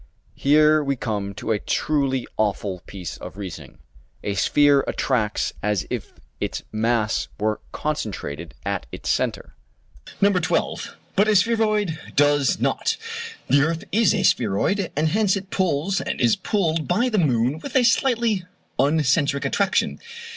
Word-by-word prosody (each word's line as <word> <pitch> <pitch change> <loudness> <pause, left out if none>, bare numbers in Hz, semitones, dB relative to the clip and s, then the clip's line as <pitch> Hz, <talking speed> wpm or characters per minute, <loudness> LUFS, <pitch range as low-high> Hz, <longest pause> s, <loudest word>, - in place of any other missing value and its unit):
Here 150 +2 +4
we 140 -1 0
come 100 -5 -3
to 110 - -3
a 105 - +1
truly 135 -3 0
awful 100 -3 -1
piece 90 -5 -7
of - - -9
reasoning. 95 -5 -8 0.5
A 100 - -1
sphere 140 +7 +4
attracts 110 -6 0
as 105 -3 0
if - - -4 0.3
its - - -3
mass 110 0 0
were 105 0 -1
concentrated 85 - -4
at - - -2
its - - -3
centre - - -2 0.7
(No. 200 +1 +5
12), 180 - -1 0.2
but 205 +2 +4
a 215 - +3
spheroid 215 -4 +2 0.2
does 145 -1 +3
not. - - 0 0.5
The 140 - +4
earth 165 +2 0
is 220 +1 +3
a 200 - 0
spheroid, 145 - +1
and 155 +2 +2
hence 205 +1 +2
it 195 -1 -6
pulls 185 +1 0
and - - -3
is 120 -3 +4
pulled 165 -7 0
by 215 +8 +2
the 215 -4 +1
moon 130 -2 +1
with 265 - -8
a 260 - +5
slightly 235 -4 +2 0.4
uncentric 140 0 +2
attraction. 200 -1 +1
145 Hz, 145 wpm, -23 LUFS, -, 0.7 s, No